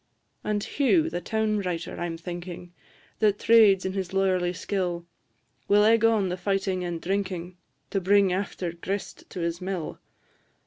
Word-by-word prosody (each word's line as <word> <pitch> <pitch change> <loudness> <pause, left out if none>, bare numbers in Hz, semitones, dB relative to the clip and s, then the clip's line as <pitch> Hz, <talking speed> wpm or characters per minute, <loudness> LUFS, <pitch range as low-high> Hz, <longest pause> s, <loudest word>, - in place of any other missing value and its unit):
And 210 -1 -1
Hugh, 320 +4 +2
the 175 - -3
town 215 +2 0
writer, 180 -4 -4
I 175 - -1
'm 165 -1 -5
thinking, 175 +1 -7 0.5
That 210 -2 +3
trades 210 -5 +5
in 190 - -1
his 190 -1 -3
lawyerly 185 -2 +2
skill, 180 -2 -2 0.6
Will 205 +1 +5
egg 225 +1 +4
on 220 -4 +3
the 180 - -2
fighting 190 0 -1
and 175 -1 -3
drinking, 185 -1 -3 0.4
To 195 - 0
bring 195 0 +4
after 185 -2 -2
grist 190 +4 -5
to 180 - -6
his 170 +1 -2
mill. 185 -3 -4
190 Hz, 160 wpm, -26 LUFS, 175-205 Hz, 0.6 s, trades